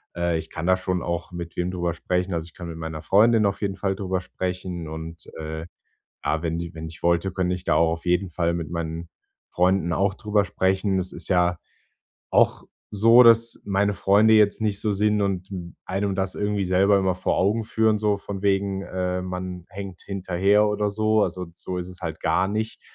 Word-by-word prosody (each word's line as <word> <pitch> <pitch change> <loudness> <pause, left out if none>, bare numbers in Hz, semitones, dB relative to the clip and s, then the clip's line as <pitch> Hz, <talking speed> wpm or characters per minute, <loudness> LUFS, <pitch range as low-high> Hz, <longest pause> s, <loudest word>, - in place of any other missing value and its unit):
äh, 85 -1 0
ich 80 0 -6
kann 80 +1 -4
da 95 0 +4
schon 90 -1 -2
auch 85 0 -3
mit 85 -1 -7
wem 90 +1 -1
drüber 85 -2 -1
sprechen. 90 +2 -1
Also, 80 -1 -2
ich 85 - -16
kann 85 - -8
mit 85 -1 -7
meiner 80 -1 -5
Freundin 110 +4 +4
auf 100 - -3
jeden 100 -2 -1
Fall 95 0 -1
darüber 95 -1 -2
sprechen 90 -2 -4
und, 80 +1 -8
äh, 80 +1 -5 0.6
ja, 80 +1 0
wenn 85 -1 -1
ji 85 -1 -6
wenn 80 0 -6
ich 80 0 -11
wollte, 85 +2 +2
könnte 90 -1 0
ich 90 0 -8
da - - +2
auch 80 0 +3
auf 85 0 -5
jeden 90 +2 +2
Fall 85 0 0
mit 85 -3 -4
meinen 85 0 -4 0.4
Freunden 90 -1 +2
auch 95 +3 +1
darüber 105 -1 +1
sprechen. 95 +1 +1
Das 95 -1 -2
ist - - -7
ja 90 -2 +2 0.7
auch - - +3 0.3
so, 115 +4 +7
dass 115 0 +4
meine 100 +1 +1
Freunde 105 +3 +4
jetzt 105 -2 +4
nicht 105 -2 -1
so 110 - 0
sind 105 +1 +2
und 95 -2 -1 0.4
einem 100 +1 -1
das 95 -1 -2
irgendwie 105 -1 -1
selber 95 +3 +4
immer 95 -1 +1
vor 90 - -1
Augen 105 +4 +2
führen, 110 -1 +2
so 105 -1 +1
von 100 -1 -7
wegen, 100 -1 +1
äh, 90 -1 -2
man 90 -1 -5
hängt 95 -2 -8
hinterher 100 +2 +2
oder 105 0 0
so, 110 +1 +2
also, 90 0 -3
so 90 +1 -6
ist 90 0 -4
es 90 0 -12
halt 80 -3 -4
gar 95 - +1
nicht. 110 +2 -3
95 Hz, 205 wpm, -24 LUFS, 85-100 Hz, 0.7 s, so